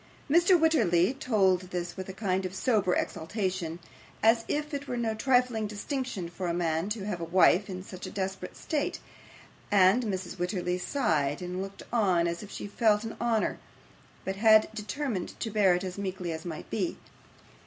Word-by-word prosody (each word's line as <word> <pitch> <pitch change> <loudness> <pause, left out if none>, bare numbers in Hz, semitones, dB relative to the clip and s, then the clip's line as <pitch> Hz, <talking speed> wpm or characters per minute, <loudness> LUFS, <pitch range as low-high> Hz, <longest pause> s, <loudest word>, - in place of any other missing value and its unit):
Mr. 345 +4 +5
Wititterly 205 - +3
told 190 -9 +1
this 175 -1 -4
with 190 0 -6
a - - -3
kind 190 -1 -1
of 185 0 -5
sober 205 -4 +2
exultation, 180 -2 -2 0.5
as 225 +1 +5
if 300 +1 -2
it 285 0 -4
were 245 - -3
no 230 -2 0
trifling 245 -2 +2
distinction 210 - -4
for 175 +2 -5
a 170 - 0
man 165 +1 0
to 210 -2 -3
have 185 -5 -3
a - - -2
wife 185 +3 +4
in 185 -1 -5
such 185 -1 -8
a - - -5
desperate 190 -1 -4
state, 295 -2 -2 0.7
and 200 +3 +5
Mrs. 190 -3 -4
Wititterly 180 0 -1
sighed 155 - 0
and 180 +1 -4
looked 195 0 -7
on, 185 -7 +3
as 170 0 -3
if 210 - -9
she - - -6
felt 210 0 +2
the 225 - -5
honour, 230 -2 +1 0.7
but 190 0 -3
had 215 0 +6
determined 215 -1 -4
to 225 - -3
bear 200 -4 +4
it 180 - -2
as 185 +1 -5
meekly 185 -3 -3
as 160 +1 -6
might 160 -3 -6
be. 190 -5 -1
195 Hz, 180 wpm, -29 LUFS, 180-225 Hz, 0.7 s, had